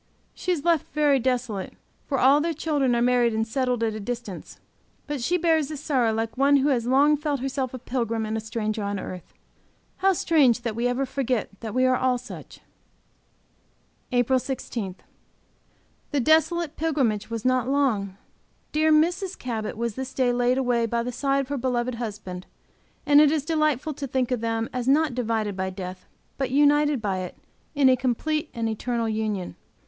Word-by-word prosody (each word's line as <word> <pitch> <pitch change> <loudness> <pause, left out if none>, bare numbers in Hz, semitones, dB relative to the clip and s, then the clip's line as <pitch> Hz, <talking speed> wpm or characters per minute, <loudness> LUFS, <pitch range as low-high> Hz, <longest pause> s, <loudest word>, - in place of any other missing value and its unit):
She 365 - -3
is 330 -4 -2
left 335 -4 +1
very 295 -2 +3
desolate, 245 -6 -2 0.3
for 275 - 0
all 275 +3 +5
their 330 +1 -1
children 285 -5 +1
are 235 - +2
married 245 -2 +3
and 220 0 +1
settled 250 -1 0
at 220 -1 0
a 215 - -5
distance. 230 -3 -6 0.5
But 290 -3 -4
she 350 +9 +1
bears 320 -4 +2
this 305 -1 -6
sorrow 250 -7 +2
like 225 0 -2
one 280 +1 +5
who 280 +1 +3
has 240 -4 0
long 280 +4 +5
felt 295 -1 -2
herself 265 0 -2
a 255 - -6
pilgrim 230 -3 -2
and 215 +1 -3
a - - -1
stranger 220 -1 -3
on 200 -1 -2
earth. 185 -1 -8 0.6
How 385 0 +3
strange 285 -9 +3
that 230 -2 -3
we 235 +2 0
ever 250 +2 0
forget 260 -3 -1
that 225 0 -6
we 255 0 +3
are 255 0 +4
all 255 -1 +1
such! 250 - -11 1.5
APRIL 250 +1 +3
16. 235 -6 -4 1.1
The 290 - 0
desolate 320 +3 +2
pilgrimage 260 -11 0
was 230 0 -5
not 255 -1 +2
long. 220 -9 0 0.5
Dear 310 +1 +2
Mrs. 350 +5 +2
Cabot 220 -4 -4
was 235 -1 -2
this 265 +3 -6
day 250 -2 +2
laid 245 +1 +2
away 245 -3 +1
by 235 +1 -1
the 250 - -3
side 275 +2 0
of 270 - -7
her 285 -1 -2
beloved 250 0 -1
husband, 200 -5 -6 0.6
and 290 +1 +7
it 300 -1 +5
is 305 -3 0
delightful 305 -2 0
to 280 0 -5
think 255 -1 -1
of 245 -3 0
them 225 0 -1
as 250 -1 -3
not 295 0 +3
divided 225 -4 -1
by 190 0 -2
death, 185 -1 -8 0.3
but 270 -2 0
united 290 -1 +3
by 195 -2 -1
it 180 -1 -6 0.4
in 280 -2 +4
a 260 - +6
complete 295 +5 -1
and 230 -1 -1
eternal 230 +1 -2
union. 215 -4 -2
255 Hz, 185 wpm, -25 LUFS, 225-285 Hz, 1.5 s, and